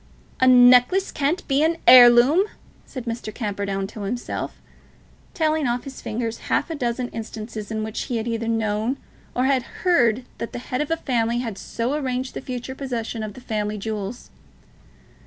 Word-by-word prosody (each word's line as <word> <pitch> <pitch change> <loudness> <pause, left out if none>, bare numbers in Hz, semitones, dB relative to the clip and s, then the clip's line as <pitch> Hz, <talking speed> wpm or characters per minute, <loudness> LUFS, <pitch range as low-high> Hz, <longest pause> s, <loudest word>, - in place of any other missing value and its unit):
"A 260 - +4
necklace 250 +9 +6
can't 295 +5 -1
be 275 0 +2
an 325 +1 +2
heirloom!" 250 +8 +8 0.4
said 255 -3 -7
Mr. 230 -2 -4
Camperdown 200 -3 -3
to 210 +2 -9
himself, 240 +5 -4 0.8
telling 310 -3 +1
off 240 +1 0
on - - -24
his 270 -1 -9
fingers 230 +1 -3
half - - +1
a - - -2
dozen 245 -2 -2
instances 220 -1 -7
in 220 -1 -2
which 220 0 -4
he 240 - -2
had 225 +1 -3
either 230 -1 -2
known 225 +2 0 0.4
or 250 - +1
had 265 -1 +3 0.2
heard 245 -9 +3
that 230 - -5
the - - -4
head 250 +2 -3
of 300 - -3
a 330 - +1
family 235 -5 0
had 235 -4 -3
so 230 +6 -3
arranged 260 -3 -2
the - - -5
future 255 0 -5
possession 240 -4 -4
of 215 -2 -6
the 255 - -11
family 210 -2 -2
jewels. 215 +2 -5
240 Hz, 175 wpm, -23 LUFS, 220-260 Hz, 0.8 s, heirloom